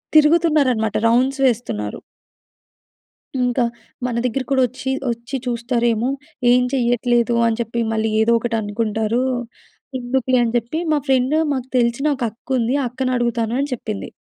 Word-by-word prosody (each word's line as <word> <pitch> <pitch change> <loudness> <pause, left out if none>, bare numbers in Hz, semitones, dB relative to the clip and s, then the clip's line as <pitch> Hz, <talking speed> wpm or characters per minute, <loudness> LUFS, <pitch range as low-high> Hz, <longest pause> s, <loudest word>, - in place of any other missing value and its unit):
తిరుగుతున్నారన్నమాట. 300 -8 +4
Rounds 260 +4 +2
వేస్తున్నారు. 215 - -1 1.4
ఇంకా 245 0 +1 0.4
మన 245 - -1
దగ్గర 255 +2 -1
కూడా 265 - +3
వచ్చి, 260 +2 -5 0.2
వచ్చి 235 +3 -6
చూస్తారేమో 235 -1 0 0.4
ఏం 250 - +5
చెయ్యట్లేదు 240 -1 +2
అని 225 0 0
చెప్పి 235 0 -3
మళ్ళీ 220 0 0
ఏదో 230 +1 +3
ఒకటి 230 0 -2
అనుకుంటారు, 220 +2 -1 0.8
ఎందుకులే 255 0 +1
అని 230 0 -1
చెప్పి 240 +7 -3
మా 300 - +3
ఫ్రెండ్ 265 +2 +2 0.2
మాకు 260 -1 -3
తెలిసిన 235 +3 +1
ఒక 255 - -5
అక్కుంది, 250 +1 -1
ఆ - - -1
అక్కనడుగుతాను" 240 -2 -1
అని 280 +1 -1
చెప్పింది. 215 -4 -5
240 Hz, 130 wpm, -20 LUFS, 230-260 Hz, 1.4 s, ఏం